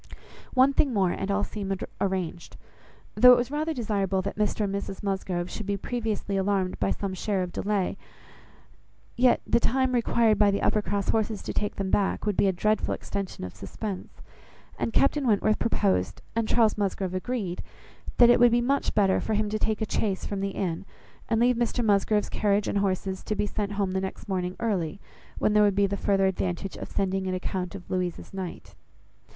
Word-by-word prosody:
One 265 +2 +5
thing 275 -2 +2
more, 190 -3 +3
and 195 - -3
all 200 +1 +1
seemed 195 -3 -4 0.2
arranged. 185 -3 -3 0.6
Though 250 +3 +8
it - - +5
was 245 +2 -2
rather 305 +2 -1
desirable 200 - -1
that - - -4
Mr 210 0 0
and 200 -2 0
Mrs 200 0 -5
Musgrove 190 -3 -2
should 210 +2 -6
be 200 0 0
previously 215 -3 -2
alarmed 190 -1 0
by 100 - +1
some 190 - -2
share 190 0 -1
of 180 - -5
delay; 200 -1 -1 1.2
yet 245 0 +4
the - - +3
time 260 +3 +1
required 230 -2 +2
by 210 -1 +5
the 200 - 0
Uppercross 205 -2 0
horses 220 -1 0
to - - -4
take 205 - -2
them 195 -1 -3
back, 200 0 +1
would 210 -2 0
be 200 - +3
a - - +4
dreadful 215 +4 0
extension 195 - -5
of 90 - -6
suspense; 190 - -7 0.6
and - - -1
Captain 275 +2 +2
Wentworth 215 0 +2
proposed, 95 - 0
and 230 -1 0
Charles 220 -3 +3
Musgrove 190 -2 -1
agreed, 185 -2 -3 0.6
that 240 -1 +8
it 240 - +4
would 245 0 +7
be 240 - +4
much 275 +3 0
better 195 -3 +3
for 220 - -1
him 210 0 0
to 215 - -1
take 220 0 0
a - - 0
chaise 195 -3 -1
from 200 - -3
the 195 0 -1
inn, 185 -3 -3 0.5
and 225 - +2
leave 245 0 +3
Mr 240 0 0
Musgrove's 210 0 +2
carriage 205 -1 +1
and 200 - 0
horses 190 -1 -1
to 215 - -3
be 210 - 0
sent 205 -1 -3
home 200 -2 -1
the 190 0 -1
next 190 - -6
morning 185 -2 -2
early, 195 -6 -1 0.4
when 210 - +1
there 210 - +5
would 205 -2 +4
be 200 0 +4
the 200 0 -1
farther 195 -1 +2
advantage 190 0 -2
of - - -7
sending 190 -1 -1
an 185 - -1
account 185 0 -3
of 180 -2 -10
Louisa's 180 -1 -3
night. 190 -2 -7
200 Hz, 200 wpm, -27 LUFS, 190-220 Hz, 1.2 s, Though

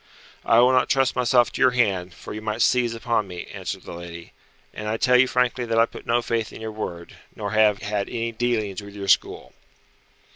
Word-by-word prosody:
"I 115 - +3
will 125 +1 +5
not 130 -1 +2
trust 135 -2 +2
myself 120 -1 +3
to - - -6
your 130 - +6
hand, 95 -6 0
for - - -9
you 110 - -6
might 110 +1 -1
seize 120 -2 +2
upon 115 -2 -1
me," 90 -1 -7
answered - - -6
the - - -9
lady, 85 0 -10 0.4
"and 105 - -6
I 110 +1 -1
tell 125 +2 +3
you 125 +1 +6
frankly 125 0 0
that 115 -1 -1
I 115 - +6
put - - -12
no 120 0 +2
faith 115 -2 -2
in - - -10
your 110 0 -5
word, 85 -5 -7 0.2
nor - - -4
have 110 -2 +3
had 100 0 -2
any 115 -1 -3
dealings 110 -4 -2
with 100 0 -12
your 100 -1 -6
school." - - +1
110 Hz, 220 wpm, -23 LUFS, 100-120 Hz, 0.4 s, your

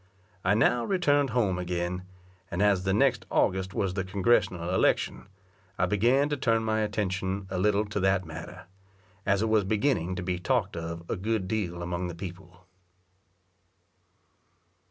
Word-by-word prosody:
I 95 +3 +3
now 120 +2 +3
returned 145 -7 +2
home 100 -8 +1
again, 90 +1 -3 0.4
and 90 +4 0
as 100 -2 +3
the 95 - +2
next - - +2
August 95 +1 +1
was 95 -2 0
the 95 0 -1
Congressional 95 -2 +1
election, - - +1 0.5
I 90 - +2
began 120 +9 +3
to 145 - -1
turn 115 -4 +1
my 110 0 0
attention 100 -2 -2
a 95 - -1
little 105 +2 +2
to 105 0 -3
that 95 -1 +2
matter, 85 +3 -9 0.6
as 100 +1 +3
it 110 - 0
was 110 -2 +3
beginning 100 - 0
to 90 - -4
be 90 0 -2
talked 100 -2 0
of 85 0 -5
a - - -1
good 105 0 -1
deal 90 -5 -2
among 90 +1 -3
the 85 - -6
people. 90 0 -10
95 Hz, 155 wpm, -28 LUFS, 90-110 Hz, 0.6 s, I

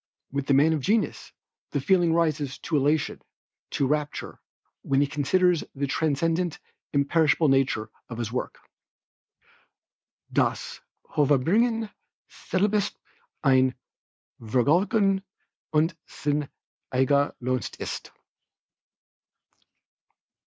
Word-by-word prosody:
With 140 0 -3
the 140 - +4
man 155 +4 +5
of 155 - 0
genius, 215 - 0 0.4
the - - -1
feeling 175 -4 +3
rises 155 -5 0
to 165 - -3
elation, 145 +2 +1 0.5
to 140 - 0
rapture, 150 +1 -2 0.4
when 135 0 +1
he 145 - +4
considers 165 +5 +2
the 140 +1 -1
transcendent, 160 +4 0 0.3
imperishable 155 +2 +3
nature 130 -5 +1 0.2
of 115 - -6
his 115 -2 -3
work. 125 - -3 1.8
"Dass - - 0 0.3
Hervorbringen 205 - +2 0.4
selbst 205 +2 -1 0.5
ein 130 -2 +4 0.7
Vergnügen 185 - +2 0.5
und 160 +2 +2
sein 145 -1 -2 0.4
eigner 140 +2 +2
Lohn 130 0 -1 0.2
ist." - - -6
150 Hz, 95 wpm, -26 LUFS, 135-170 Hz, 1.8 s, man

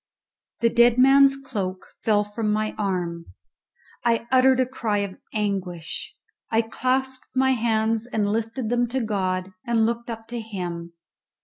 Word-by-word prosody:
The 230 0 +3
dead 235 0 +5
man's 275 +1 +6
cloak 200 -9 -4 0.2
fell 210 -2 +3
from 210 +1 -2
my 215 0 0
arm; 175 -4 -2 0.8
I 230 -1 +1
uttered 260 0 +5
a 255 - +4
cry 230 -5 -2
of 190 -1 -10
anguish; 190 -6 -3 0.3
I 225 0 +2
clasped 260 +3 -1
my 265 0 +3
hands 225 -1 +1
and 220 -4 0
lifted 225 +2 -2
them 245 0 +2
to 260 +3 -1
God, 185 -3 -1
and 230 -2 +2
looked 235 +1 -2
up 225 -1 -6
to 240 0 -4
Him. 175 -6 -6
225 Hz, 145 wpm, -24 LUFS, 205-245 Hz, 0.8 s, man's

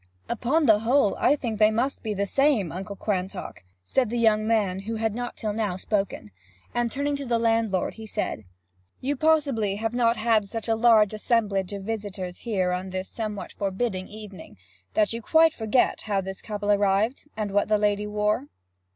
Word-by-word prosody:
'Upon 260 +7 +1
the 215 -4 +6
whole, 230 -1 +3
I 290 - +4
think 230 -7 -4
they 215 0 +6
must 240 +6 -1
be 215 -2 -3
the 200 +1 0
same, 265 - +2
Uncle 195 +3 -6
Quantock,' 190 - -4 0.2
said 250 - +1
the 240 - -2
young 215 -2 +3
man, 205 -5 +1
who 220 +4 -4
had 220 -1 -1
not 245 +2 -5
till 215 -2 -2
now 210 -4 -1
spoken. 195 - -2 0.4
And 240 -1 0
turning 285 +3 -1
to 280 - -6
the 235 -1 +2
landlord: 225 -4 +1 1.1
'You 280 +3 -1
possibly 280 -9 +2
have 225 +2 -2
not 235 -1 +2 0.3
such 225 +2 -5
a 225 - +3
large 220 -2 +5
assemblage 210 -4 0
of 200 -1 -5
visitors 200 -4 -5
here, 190 -6 0
on 180 +1 -3
this 185 +1 -4
somewhat 215 -3 -5
forbidding 195 -1 -2
evening, 205 - -11 0.4
that 215 0 +2
you 230 - -4
quite 320 +5 +4
forget 225 +1 +1
how 205 -2 -1
this 190 0 -6
couple 205 -1 -2
arrived, 205 +7 +1
and 210 -2 -2
what 205 +1 +2
the 215 0 +3
lady 210 0 +1
wore?' 210 +5 0
215 Hz, 175 wpm, -25 LUFS, 200-235 Hz, 1.1 s, the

